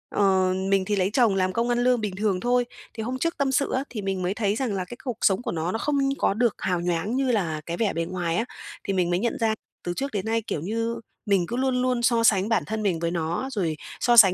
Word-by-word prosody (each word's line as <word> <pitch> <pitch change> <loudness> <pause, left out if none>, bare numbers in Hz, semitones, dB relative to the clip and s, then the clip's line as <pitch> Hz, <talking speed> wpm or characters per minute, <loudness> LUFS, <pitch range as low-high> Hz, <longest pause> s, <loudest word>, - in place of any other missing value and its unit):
ờ, 190 -2 +3 0.2
mình 195 -1 +3
thì 205 0 0
lấy 190 0 +1
chồng 230 -7 +4
làm 185 -1 +1
công 235 +1 0
ăn 240 0 +2
lương 250 -2 +3
bình 200 -3 -3
thường 200 -2 0
thôi. 245 +2 +2 0.3
Thì 220 - -5
hôm 255 +3 -3
trước 335 +1 -1
tâm 275 -1 +1
sự 275 +2 +1
á, 260 - +1
thì 215 -4 -5
mình 195 -1 -2
mới 180 +2 0
thấy 205 -1 0
rằng 235 -3 -1
là 185 -2 -2
cái 240 - -9
cuộc 245 -4 -3
sống 195 0 +3
của - - -3
nó 170 +1 -2
nó - - -1
không 295 +2 0 0.2
có - - +2
được 235 +1 +1
hào 180 -2 -1
nhoáng 175 +7 -1
như 265 -2 +2
là 165 -8 0
cái 170 0 -4
vẻ 220 -4 +1
bề 165 0 -1
ngoài 175 -1 -2
á, 230 - +1 0.4
thì 195 - -1
mình 180 -2 +1
mới 175 - +1
nhận 235 +3 -1
ra 220 -1 +2 0.3
từ 175 - -2
trước 275 +1 -2
đến 200 -3 -2
nay, 225 +1 +1
kiểu 210 -8 -4
như, 230 +6 -2 0.3
mình 195 -4 +2
cứ 235 - -3
luôn 260 -1 +1
luôn 250 -1 +1
so 230 0 +3
sánh 205 -1 +4
bản 225 - +2
thân 220 0 -3
mình 180 -5 +1
với 170 0 -1
nó, 170 +9 -2
rồi 170 -9 -1 0.2
so 240 -1 +3
sánh 195 -5 +9
210 Hz, 280 wpm, -25 LUFS, 185-240 Hz, 0.4 s, sánh